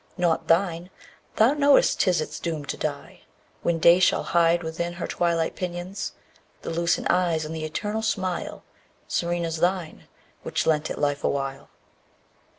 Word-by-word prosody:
Not 175 -3 +1
thine. 170 0 +1 0.5
Thou 230 +6 +5
knowest 285 -1 +4
'tis 180 -4 +3
its 155 0 -5
doom 160 -4 -3
to - - -3
die, - - -5 0.4
When 170 -1 +1
Day 170 +2 +6
shall 185 - +3
hide 170 0 +2
within 170 +2 -3
her 175 - -5
twilight 170 -2 0
pinions 180 +2 -4 0.5
The - - -4
lucent 170 +1 0
eyes, 175 -3 +1
and 160 +1 -5
the 155 -1 -4
eternal 210 +7 -3
smile, 190 -5 -2 0.4
_15 - - -15
Serene 170 0 0
as 165 0 -3
thine, 175 -1 -1 0.3
which - - -2
lent 155 -1 +1
it - - -4
life 145 -1 -1
awhile. 135 0 -2
170 Hz, 155 wpm, -25 LUFS, 160-180 Hz, 0.5 s, Day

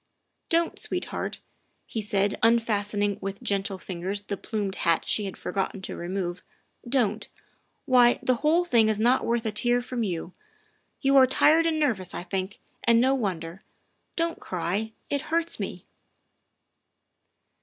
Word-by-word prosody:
' - - -51
' - - -51
Don 335 0 +2
't, - - -15
sweetheart, - - -4 0.2
' - - -44
' - - -46
he 225 - -4
said, 205 -1 +1
unfastening 210 -3 +2
with 195 +1 -5
gentle 195 -1 -1
fingers 185 +2 -4
the 205 0 -4
plumed 200 -2 -3
hat 165 -1 +1
she 210 - +1
had 195 - -6
forgotten 195 0 -3
to - - -4
remove, 175 0 -3 0.3
" - - -16
don't. 225 -5 +1 0.6
Why, 245 -3 +5
the 255 -1 +2
whole 325 +7 +3
thing 230 -9 +4
is 215 -1 0
not 245 +4 +3
worth 235 0 0
a 220 - 0
tear 240 +3 +2
from 245 0 -4
you. 180 -4 -3 0.7
You 275 0 +4
are 260 -1 +8
tired 320 +5 +4
and 315 -1 0
nervous, 220 - 0
I - - -4
think, 190 +2 -3 0.3
and 235 0 +5
no 260 +3 +4
wonder. 185 -7 -3 0.5
Don 335 0 0
't - - -21
cry; 190 +5 -2 0.2
it 285 -1 +1
hurts 335 +1 0
me. - - -5
215 Hz, 170 wpm, -26 LUFS, 195-250 Hz, 0.7 s, are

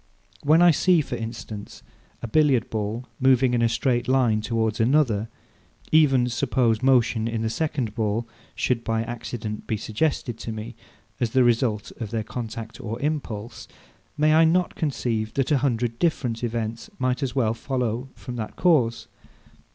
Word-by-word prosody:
When 155 +4 +5
I 175 - +8
see, 175 +3 +3
for 130 - -5
instance, 110 -2 -7 0.4
a - - -2
Billiard 135 -2 +2
ball 110 +3 -3
moving 130 -1 +4
in 120 - +2
a 115 - +3
straight 120 +1 0
line 125 -5 +3
towards 110 0 -1
another; 115 -3 +2 0.6
even 135 -6 +5
suppose 120 -2 +1
motion 125 -3 +3
in 115 -1 -2
the 110 - -1
second 135 -7 -2
ball 110 +1 -1 0.3
should 120 -2 0
by 115 0 0
accident 115 -2 -6
be 110 - -1
suggested 115 +1 -2
to 115 - -5
me, 110 +2 -6 0.5
as 120 - +1
the 130 - +5
result 115 -3 +1
of 115 -4 -4
their 110 0 -2
contact 115 0 -6
or 115 +2 -5
impulse; 120 -7 -4 0.5
may 155 +1 +4
I 160 +1 +6
not 175 +2 +2
conceive, 115 -7 -2
that 135 +2 0
a 145 - +4
hundred 120 -3 -1
different 125 -9 0
events 115 - -3
might 130 +2 0
as 130 -2 -2
well 115 -5 +2
follow 125 0 -2
from 125 -2 -7
that 110 -2 -5
cause? 135 -10 +2
120 Hz, 160 wpm, -24 LUFS, 110-135 Hz, 0.6 s, I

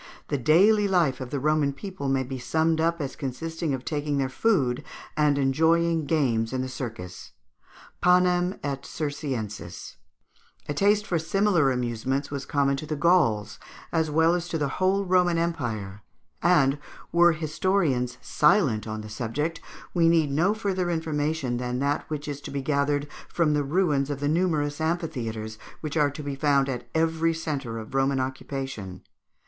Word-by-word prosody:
The 145 - 0
daily 200 - +5
life 170 -9 +2
of 130 - -5
the 140 +1 -2
Roman 150 0 +2
people 140 -1 -5
may 135 -1 +1
be 130 0 -6
summed 160 +4 +1
up 170 +1 +1
as 140 -2 -4
consisting 160 +4 -4
of 130 - -9
taking 145 -1 -1
their 135 -1 0
food 140 - +1 0.3
and 150 -2 +3
enjoying 160 +4 +2
games 125 -7 +1
in 130 0 -1
the - - -3
circus 110 -9 -7 0.7
(panem 180 0 +3
et 140 -1 -3
circenses). 125 - -5 0.7
A 145 - -1
taste 205 +6 +3
for 175 -4 0
similar 175 -2 +2
amusements 125 +3 -2
was 140 -1 -4
common 140 -1 +1
to 155 - -6
the 155 - -2
Gauls 115 - +2 0.3
as 160 -2 +1
well 160 +2 +3
as 175 -1 -2
to 165 - -2
the 145 -2 0
whole 195 +2 +2
Roman 180 -2 +3
Empire; 115 - -3 0.4
and, 150 -5 +3 0.3
were 170 0 +5
historians 155 -5 0
silent 150 - +2
on 110 0 -4
the 110 - -8
subject, 125 +10 -3 0.3
we 165 -2 +4
need 160 -4 +3
no 175 +9 +2
further 190 -4 -1
information 155 -5 -1
than 125 0 -2
that 140 +2 -1
which 150 -1 -4
is 145 -1 -5
to - - -8
be 140 -1 -3
gathered 145 0 0 0.2
from 160 -3 +1
the 150 - +2
ruins 145 -2 +1
of 145 -2 -3
the 145 - -1
numerous 155 -3 0
amphitheatres, 115 -10 -3 0.2
which 155 -1 -4
are 150 -2 +3
to 145 +2 -8
be 140 -1 -3
found 140 -1 +2
at 125 -2 -5
every 165 0 +1
centre 145 -8 -3
of 110 +3 -8
Roman 135 0 +2
occupation. 130 -6 -5
145 Hz, 165 wpm, -26 LUFS, 130-165 Hz, 0.7 s, daily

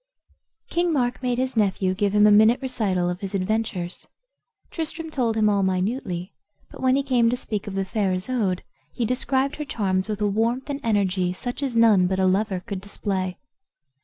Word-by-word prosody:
King 345 0 +1
Mark 250 -5 0
made 250 -2 0
his 260 0 -1
nephew 190 -3 +1
give 200 +1 0
him 210 0 +6
a 210 - +6
minute 220 +4 +6
recital 210 -9 0
of 180 0 -2
his 195 0 -5
adventures. 190 -2 -2 0.6
Tristram 325 0 -4
told 235 -6 0
him 215 -1 +3
all 200 -1 +2
minutely; 190 -1 -2 0.4
but - - -11
when 260 0 +3
he 275 - +1
came 245 -4 +3
to 245 - 0
speak 210 -4 -4
of 195 - -5
the 195 0 -1
fair 195 -1 0
Isoude 185 -1 -1 0.3
he 235 - 0
described 265 +3 0
her 300 - -3
charms 190 -7 -1
with 210 -1 -3
a 210 - +1
warmth 230 +7 0
and 280 - -3
energy 190 -5 +1
such 245 +8 -5
as 270 -4 -2
none 215 -6 +5
but 190 +1 -1
a 190 - +2
lover 190 0 +1
could 200 -2 -6
display. 190 -2 -3
210 Hz, 190 wpm, -24 LUFS, 190-250 Hz, 0.6 s, him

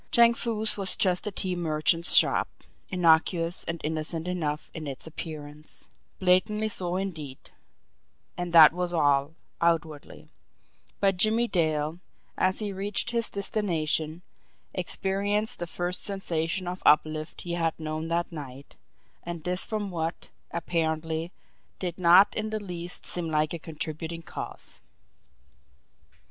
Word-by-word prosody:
Chang 235 0 +6
Foo's 220 -2 0
was 195 -1 -1
just 185 +1 +1
a - - -1
tea 185 -1 -2
merchant's 165 0 +2
shop, - - +5 0.4
innocuous 170 -1 +3
and 170 0 -3
innocent 160 +2 -3
enough 155 -5 -2
in 155 -2 -6
its 135 -2 -6
appearance, 155 -2 -7 0.3
blandly 210 +4 +3
so 180 -3 -1
indeed, 160 -8 -5 0.8
and 175 -1 -4
that 160 -2 +9
was 180 0 -2
all 145 -1 +2 0.3
outwardly; 160 -3 -1 0.7
but 195 -2 +2
Jimmie 220 +5 +4
Dale, 155 -3 0 0.4
as 185 0 +1
he 210 -2 -1
reached 200 +4 -2
his 235 -1 0
destination, 170 -5 -1 0.5
experienced 200 +5 -1
the 175 - -3
first 175 +2 -1
sensation 180 -2 -2
of 180 +1 -4
uplift 155 +1 +2
he 175 - -4
had 165 -2 -1
known 155 0 -3
that 170 +1 -1
night, 140 -3 -9 0.4
and 170 -2 -6
this 180 +2 +1
from 210 -3 -3
what, 165 -1 -4 0.2
apparently, 160 0 -2 0.5
did 180 -1 -4
not 180 +3 +7
in 215 0 -2
the 215 0 -2
least 180 -3 -2
seem 170 -2 0
like 155 0 +1
a 170 - -4
contributing 160 +1 -5
cause. - - -7
170 Hz, 130 wpm, -27 LUFS, 160-190 Hz, 0.8 s, that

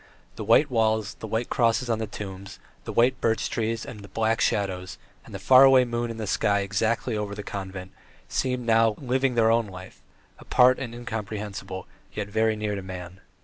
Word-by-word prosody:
The - - -5
white 115 +7 +4
walls, 110 -2 +1
the 110 - -9
white 115 +3 -2
crosses 115 +1 +2
on 115 -2 0
the 110 - -3
tombs, 100 -1 -8 0.3
the - - -4
white 125 +2 +2
birch 110 -1 +1
trees 115 0 -2
and 100 -4 -10
black 115 0 +1
shadows, 95 -2 -1 0.3
and - - -13
the - - -5
far 130 0 +7
away 135 -2 +6
moon 120 0 -2
in 115 - -6
the 110 - -4
sky 100 0 +1
exactly 110 +4 -1
over 105 -1 -3
the 105 - -6
convent, 95 -2 -6 0.4
seemed 125 -2 -2
now 115 -1 +3
living 130 0 0
their 115 -1 +4
own 115 -1 +2
life, 95 -1 -11 0.4
apart 125 +1 +4
and 120 -3 -6
incomprehensible, 105 -5 -6 0.3
yet 105 -1 -4
very 110 +1 +1
near 105 -1 -2
to 100 - -4
man. 90 -1 -8
110 Hz, 190 wpm, -25 LUFS, 100-120 Hz, 0.4 s, far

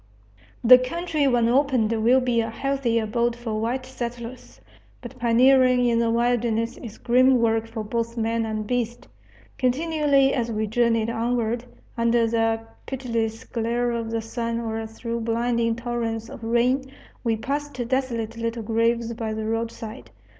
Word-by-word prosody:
The 250 +2 +9
country 310 +2 -1
when 240 -3 +3
opened 255 -3 +2
will 230 +3 +3
be 245 -2 +1
a 225 - -3
healthy 270 -1 -1
abode 230 +2 0
for 225 -3 -4
white 250 +3 -2
settlers. 235 - -7 0.4
But - - -10
pioneering 250 +1 +4
in 235 -1 +2
the 230 -1 +2
wilderness 235 -1 +1
is 220 -3 -9
grim 255 +2 +4
work 225 -1 +1
for 225 -1 -5
both 230 +2 -3
man 230 0 0
and 215 -1 -3
beast. 240 0 -2 0.5
Continually, 280 0 +2
as 235 -3 -1
we 220 0 -1
journeyed 230 0 +1
onward, 235 0 -1 0.3
under 230 0 +3
the 225 0 +1 0.3
pitiless 230 -3 -2
glare 240 0 -1
of 230 -1 -3
the 225 0 -2
sun 230 0 -3
or 225 -1 -3
through 230 +1 -5
blinding 230 0 0
torrents 230 -1 -3
of 255 -4 -10
rain, 250 +4 +1 0.3
we 230 -2 +1
passed 285 +4 -3
desolate 235 -3 -2
little 230 0 -3
graves 230 +1 +1
by 220 -2 -4
the 220 0 -3
roadside. 225 +1 -4
235 Hz, 150 wpm, -24 LUFS, 225-250 Hz, 0.5 s, The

